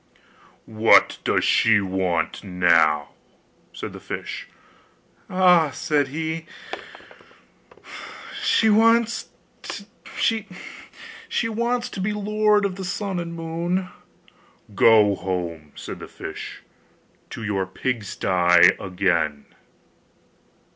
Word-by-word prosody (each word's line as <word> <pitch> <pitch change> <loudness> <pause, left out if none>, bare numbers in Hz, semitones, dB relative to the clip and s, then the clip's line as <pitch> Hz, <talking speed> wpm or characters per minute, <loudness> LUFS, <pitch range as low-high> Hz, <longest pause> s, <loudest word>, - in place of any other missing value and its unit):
'What 110 0 +4
does - - +1
she 115 -2 +4
want 95 -4 -2
now?' 85 -6 +2 0.6
said - - -7
the - - -9
fish. - - -6 0.8
'Ah!' 180 -4 +4
said 145 -1 0
he, 160 +3 -4 1.9
'she 225 - +3
wants 230 +2 +3 0.3
to 200 0 -7 2.1
be 205 +3 -1
lord 210 0 +2
of 190 -1 -3
the 190 - -5
sun 190 0 -3
and 170 -1 -5
moon.' 170 +3 -3 0.8
'Go 105 0 +5
home,' 85 -5 -4
said - - -8
the - - -9
fish, - - -8 0.7
'to 115 - -8
your 100 -3 -1
pigsty 95 -6 +2
again. 85 -6 -1
115 Hz, 85 wpm, -23 LUFS, -, 2.1 s, Go